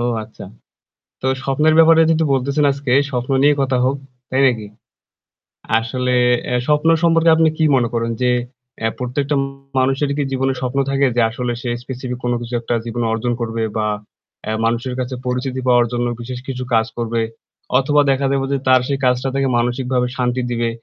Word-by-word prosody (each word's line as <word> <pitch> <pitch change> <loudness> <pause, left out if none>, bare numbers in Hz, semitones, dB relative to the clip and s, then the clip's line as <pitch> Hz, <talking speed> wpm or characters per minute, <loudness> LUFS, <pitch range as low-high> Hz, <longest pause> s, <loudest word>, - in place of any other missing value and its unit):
ও, - - -1 0.2
আচ্ছা। 110 - -11 0.8
তো - - -1 0.2
স্বপ্নের 150 +4 +2
ব্যাপারে 165 0 +7
যেহেতু 160 0 +2
বলতেছেন 140 +3 +1
আজকে 140 -2 -4 0.2
স্বপ্ন 125 +1 -2
নিয়ে 145 0 +5
কথা 135 -1 +1
হোক, 135 - +1 0.3
তাই 130 +1 +1
নাকি? 110 -4 -1 1.1
আসলে 125 +3 -2 0.4
আ - - +2
স্বপ্ন 150 +2 +3
সম্পর্কে 165 0 +4
আপনি 160 -1 +4
কী 160 - +1
মনে 120 -2 +2
করেন? 115 0 -1
যে 125 0 +3 0.5
এ - - +4
প্রত্যেকটা 140 +4 -1 0.4
মানুষেরই 135 +2 +1
কি 145 - +1
জীবনে 135 0 0
স্বপ্ন 130 +2 -1
থাকে 140 0 +2
যে 120 - +3
আসলে 120 +1 -3
সে 120 - -3
specific 125 -1 -5
কোন 120 - 0
কিছু 120 0 -7
একটা 120 - -2
জীবনে 120 0 -2
অর্জন 120 +2 -1
করবে 115 -1 -2
বা 110 -1 0 0.6
এ - - 0
মানুষের 120 +2 -1
কাছে 130 0 -3
পরিচিতি 130 +1 -2
পাওয়ার 120 -1 +5
জন্য 120 0 0
বিশেষ 125 +1 -6
কিছু 130 -1 -4
কাজ 110 -1 +4
করবে? 115 0 -1 0.6
অথবা 145 +2 +3
দেখা 135 +1 0
দেবে 135 -1 0
যে 140 - +2
তার 130 -1 +5
সেই 140 -1 -1
কাজটা 125 +1 +1
থেকে 135 -1 +1
মানসিকভাবে 125 +1 0
শান্তি 125 0 0
দিবে। 120 -1 0
130 Hz, 180 wpm, -19 LUFS, 120-140 Hz, 1.1 s, ব্যাপারে